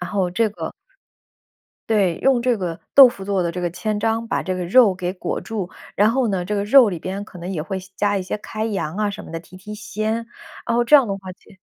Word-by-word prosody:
然 180 Hz, 0 st, -5 dB
后 190 Hz, -3 st, 0 dB
这 225 Hz, +4 st, +1 dB
个 205 Hz, -, -6 dB, 1.2 s
对， 195 Hz, -6 st, +2 dB
用 265 Hz, -2 st, +4 dB
这 245 Hz, -1 st, +1 dB
个 175 Hz, -4 st, -4 dB, 0.2 s
豆 270 Hz, -2 st, +10 dB
腐 195 Hz, -5 st, -8 dB
做 195 Hz, -2 st, 0 dB
的 170 Hz, -, -1 dB
这 180 Hz, +1 st, -5 dB
个 175 Hz, -, 0 dB
千 210 Hz, +5 st, -3 dB
张， 225 Hz, +1 st, -1 dB
把 -, -, -1 dB
这 185 Hz, -, -2 dB
个 180 Hz, -, -3 dB
肉 200 Hz, +1 st, +5 dB
给 180 Hz, 0 st, -3 dB
裹 185 Hz, -, -4 dB
住。 210 Hz, -6 st, -4 dB, 0.3 s
然 205 Hz, +2 st, +5 dB
后 245 Hz, 0 st, +1 dB
呢， 185 Hz, -3 st, -1 dB
这 210 Hz, -, -2 dB
个 200 Hz, -, 0 dB
肉 245 Hz, +2 st, +7 dB
里 175 Hz, -5 st, -4 dB
边 195 Hz, +4 st, -4 dB
可 195 Hz, -, -14 dB
能 175 Hz, +3 st, -5 dB
也 165 Hz, -, -3 dB
会 190 Hz, +3 st, -4 dB
些 185 Hz, -, -15 dB
加 205 Hz, -1 st, +1 dB
一 190 Hz, -, -1 dB
些 185 Hz, -, -4 dB
开 215 Hz, +1 st, -5 dB
洋 190 Hz, -5 st, -3 dB
啊 210 Hz, -1 st, 0 dB
什 200 Hz, -, -8 dB
么 -, -, -11 dB
的， 165 Hz, -, -4 dB
提 180 Hz, +2 st, -15 dB
提 210 Hz, +3 st, -9 dB
鲜， 215 Hz, 0 st, -3 dB, 0.5 s
然 235 Hz, -, 0 dB
后 240 Hz, -, +3 dB
这 300 Hz, -, +4 dB
样 275 Hz, -3 st, +8 dB
的 -, -, -1 dB
话， 185 Hz, -1 st, -9 dB
其 -, -, -22 dB
200 Hz, 285 characters per minute, -21 LUFS, 180-220 Hz, 1.2 s, 豆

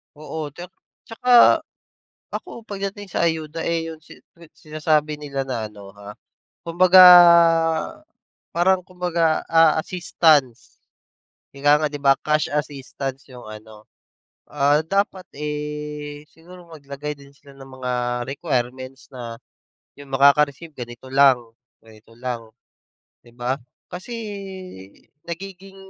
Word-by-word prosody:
Oo, 155 Hz, +1 st, -6 dB
tsak 175 Hz, +3 st, -10 dB, 0.3 s
tsaka 245 Hz, +6 st, +5 dB, 0.7 s
ako 235 Hz, -, -8 dB
pagdating 200 Hz, 0 st, -6 dB
sa -, -, 0 dB
ayuda, 160 Hz, 0 st, -4 dB
eh, 165 Hz, -1 st, -1 dB
yung 160 Hz, -1 st, -12 dB
si-sinasabi 155 Hz, -2 st, -4 dB
nila 140 Hz, -2 st, -4 dB
na 115 Hz, -4 st, -3 dB
ano, 100 Hz, -2 st, -13 dB
ha, 100 Hz, 0 st, -11 dB, 0.5 s
kumbaga 185 Hz, +2 st, +5 dB, 1.5 s
parang 185 Hz, +2 st, +2 dB
kumbaga, 175 Hz, -4 st, -1 dB
ah, 165 Hz, -1 st, +4 dB
assistance. 155 Hz, -8 st, +1 dB, 0.8 s
Ika 145 Hz, +2 st, +3 dB
nga, -, -, +2 dB
'di 145 Hz, -, -6 dB
ba, 135 Hz, -1 st, +5 dB
cash 150 Hz, 0 st, 0 dB
assistance 140 Hz, -2 st, -5 dB
yung 125 Hz, -2 st, -12 dB
ano, 110 Hz, 0 st, -13 dB, 0.6 s
ah, 145 Hz, +1 st, +2 dB
dapat, 195 Hz, 0 st, -1 dB
eh, 150 Hz, 0 st, -6 dB
siguro 175 Hz, +2 st, -16 dB
maglagay 145 Hz, -1 st, -7 dB
din 140 Hz, 0 st, -17 dB
sila 140 Hz, 0 st, -18 dB
ng 135 Hz, 0 st, -12 dB
mga 125 Hz, -1 st, -2 dB, 0.4 s
requirements 130 Hz, -3 st, -4 dB
na 120 Hz, -3 st, -7 dB, 0.6 s
yung 140 Hz, -1 st, -13 dB
makaka-receive 140 Hz, +3 st, +3 dB
ganito 120 Hz, 0 st, -9 dB
lang, 135 Hz, -1 st, +5 dB, 0.5 s
ganito 110 Hz, 0 st, -19 dB
lang, 120 Hz, -3 st, -6 dB, 0.7 s
'di 120 Hz, -, -19 dB
ba? 125 Hz, +2 st, -2 dB, 0.3 s
Kasi 185 Hz, +7 st, -8 dB, 1.1 s
nagiging 190 Hz, +2 st, -9 dB
150 Hz, 110 wpm, -22 LUFS, 135-170 Hz, 1.5 s, tsaka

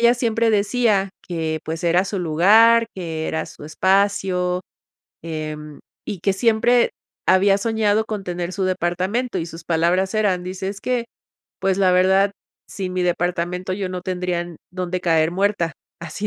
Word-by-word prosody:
ella 235 Hz, +1 st, +5 dB
siempre 230 Hz, -2 st, +1 dB
decía: 210 Hz, -1 st, +2 dB
"Que, 160 Hz, -2 st, -3 dB
pues, 160 Hz, 0 st, -4 dB
era 175 Hz, +2 st, +3 dB
su 195 Hz, 0 st, -3 dB
lugar, 215 Hz, +8 st, +5 dB
que 165 Hz, -4 st, -4 dB
era 160 Hz, 0 st, -2 dB
su -, -, -12 dB
espacio, 185 Hz, +1 st, +1 dB, 0.6 s
em, 155 Hz, -2 st, -6 dB, 0.2 s
y 190 Hz, -, -5 dB
que 195 Hz, +2 st, +2 dB
siempre 235 Hz, +2 st, +3 dB, 0.4 s
había 195 Hz, +1 st, +4 dB
soñado 220 Hz, 0 st, +1 dB
con 210 Hz, -3 st, -4 dB
tener 175 Hz, 0 st, -4 dB
su 190 Hz, 0 st, -2 dB
departamento", 185 Hz, +6 st, -1 dB
y 165 Hz, -, -2 dB
sus 165 Hz, 0 st, -9 dB
palabras 175 Hz, +4 st, +1 dB
eran, 195 Hz, -5 st, +1 dB
dice, 190 Hz, +1 st, -4 dB
es 200 Hz, +1 st, -6 dB
que: 250 Hz, -2 st, -1 dB, 0.6 s
"Pues, 190 Hz, -1 st, +1 dB
la 185 Hz, -2 st, +4 dB
verdad, 190 Hz, +2 st, +4 dB, 0.4 s
sin 185 Hz, -2 st, -5 dB
mi 185 Hz, -, 0 dB
departamento, 180 Hz, +1 st, -1 dB
yo 195 Hz, -1 st, -3 dB
no 180 Hz, -, -4 dB
tendría 180 Hz, -1 st, -2 dB
en 175 Hz, -2 st, -10 dB
dónde 180 Hz, 0 st, -3 dB
caer 165 Hz, -2 st, +3 dB
muerta". 190 Hz, -3 st, 0 dB, 0.3 s
Así 170 Hz, +5 st, -5 dB
185 Hz, 160 wpm, -21 LUFS, 175-205 Hz, 0.6 s, ella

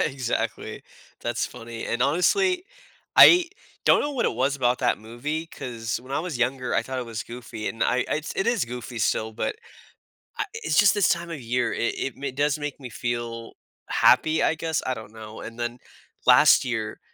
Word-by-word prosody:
exactly. 130 Hz, -4 st, -2 dB, 0.4 s
That's -, -, -1 dB
funny. 115 Hz, -1 st, -8 dB
And, 120 Hz, -, 0 dB
honestly, 365 Hz, -, +2 dB, 0.5 s
I 350 Hz, -1 st, +9 dB, 0.4 s
don't -, -, +6 dB
know 290 Hz, -, -1 dB
what 250 Hz, -, -1 dB
it -, -, -1 dB
was 135 Hz, +3 st, +1 dB
about 125 Hz, -1 st, +1 dB
that -, -, +1 dB
movie, 140 Hz, +9 st, -4 dB
'cause 120 Hz, -7 st, -5 dB
when 130 Hz, +2 st, -10 dB
I 140 Hz, -, 0 dB
was 165 Hz, -7 st, -4 dB
younger, 125 Hz, 0 st, 0 dB
I 115 Hz, -, +2 dB
thought 130 Hz, +1 st, -5 dB
it 125 Hz, -, -4 dB
was 115 Hz, -2 st, -5 dB
goofy, 115 Hz, -2 st, -8 dB
and 115 Hz, -, -3 dB
I 125 Hz, -, +1 dB
it's 155 Hz, 0 st, -2 dB
it 195 Hz, -, 0 dB
is 235 Hz, -, +2 dB
goofy 120 Hz, 0 st, -7 dB
still, 110 Hz, +3 st, 0 dB
but 120 Hz, -, -3 dB, 0.8 s
a -, -, +2 dB
it's 450 Hz, 0 st, -2 dB
just 205 Hz, -1 st, +6 dB
this 205 Hz, -2 st, +3 dB
time 170 Hz, 0 st, 0 dB
of 155 Hz, -, -5 dB
year. 120 Hz, +2 st, 0 dB
It 115 Hz, -, -1 dB
it 135 Hz, -, -3 dB
m 135 Hz, -2 st, -3 dB
does 145 Hz, +1 st, +1 dB
make 145 Hz, -1 st, -5 dB
me 125 Hz, -2 st, -8 dB
feel 115 Hz, -1 st, -4 dB, 0.4 s
happy, 160 Hz, 0 st, +4 dB
I 160 Hz, -, +2 dB
guess. 160 Hz, 0 st, -2 dB
I 130 Hz, -, 0 dB
don't 110 Hz, -2 st, -9 dB
know. 110 Hz, -1 st, -10 dB
And 115 Hz, +1 st, -9 dB
then 120 Hz, +1 st, -3 dB, 0.5 s
last -, -, +7 dB
year, -, -, -3 dB
125 Hz, 195 wpm, -25 LUFS, 115-155 Hz, 0.8 s, I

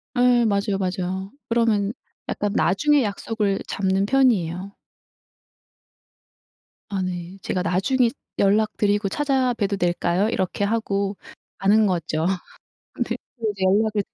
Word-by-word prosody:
예 245 Hz, -1 st, +4 dB
맞아요, 200 Hz, -1 st, +1 dB
맞아요. 190 Hz, +1 st, -3 dB, 0.2 s
그러면 225 Hz, -3 st, +2 dB, 0.4 s
약간 205 Hz, 0 st, -1 dB
나중에 290 Hz, +8 st, +3 dB
약속을 205 Hz, -1 st, -1 dB
잡는 195 Hz, 0 st, 0 dB
편이에요. 200 Hz, -8 st, +2 dB, 2.2 s
아 200 Hz, -2 st, -2 dB
네. 180 Hz, 0 st, -5 dB
"제가 180 Hz, -, -2 dB
나중에 230 Hz, +8 st, +2 dB, 0.3 s
연락드리고 205 Hz, 0 st, +2 dB
찾아봬도 255 Hz, -7 st, 0 dB
될까요?" 175 Hz, +3 st, +1 dB
이렇게 190 Hz, -1 st, -1 dB
하고 200 Hz, -2 st, -1 dB, 0.4 s
가는 210 Hz, +3 st, +4 dB
거죠. 165 Hz, -4 st, -1 dB, 0.8 s
네 -, -, -3 dB, 0.2 s
그리고 225 Hz, -4 st, -1 dB
이제 195 Hz, -2 st, -5 dB
연락을 205 Hz, +2 st, +2 dB
200 Hz, 260 characters per minute, -23 LUFS, 190-225 Hz, 2.2 s, 예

